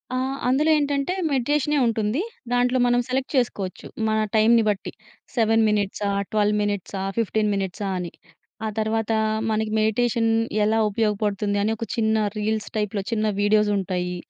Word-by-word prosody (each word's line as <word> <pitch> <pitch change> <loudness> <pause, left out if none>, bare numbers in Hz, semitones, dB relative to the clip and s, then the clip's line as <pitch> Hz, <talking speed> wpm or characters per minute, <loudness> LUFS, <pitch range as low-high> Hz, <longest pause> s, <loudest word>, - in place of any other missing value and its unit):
ఆ! - - 0 0.3
అందులో 280 +5 +2
ఏంటంటే 285 +2 0 0.2
మెడిటేషనే 290 +3 +1
ఉంటుంది. 225 - 0 0.3
దాంట్లో 245 +1 +2
మనం 245 0 +3
సెలెక్ట్ 260 +1 -2
చేసుకోవచ్చు 205 -7 -1 0.2
మన 220 0 +1 0.2
టైంని 225 +1 +5
బట్టి. 195 -3 -2 0.4
7 225 -1 +3
మినిట్సా, 205 -1 -1 0.2
12 210 0 +2
మినిట్సా, 205 -1 -3 0.2
15 215 -1 +1
మినిట్సా 195 +1 -3
అని 175 -2 -4 0.5
ఆ - - 0
తర్వాత 220 0 0 0.4
మనకి 215 0 -1
మెడిటేషన్ 225 +1 +1 0.3
ఎలా 220 +1 +2
ఉపయోగపడుతుంది 205 -1 0
అని 220 - +1
ఒక 230 - -4
చిన్న 220 -1 +1 0.2
రీల్స్ 215 0 -1
టైప్‌లో 210 -1 -1
చిన్న 220 -1 0
వీడియోసుంటాయి. 200 -4 +1
220 Hz, 135 wpm, -23 LUFS, 205-235 Hz, 0.5 s, టైంని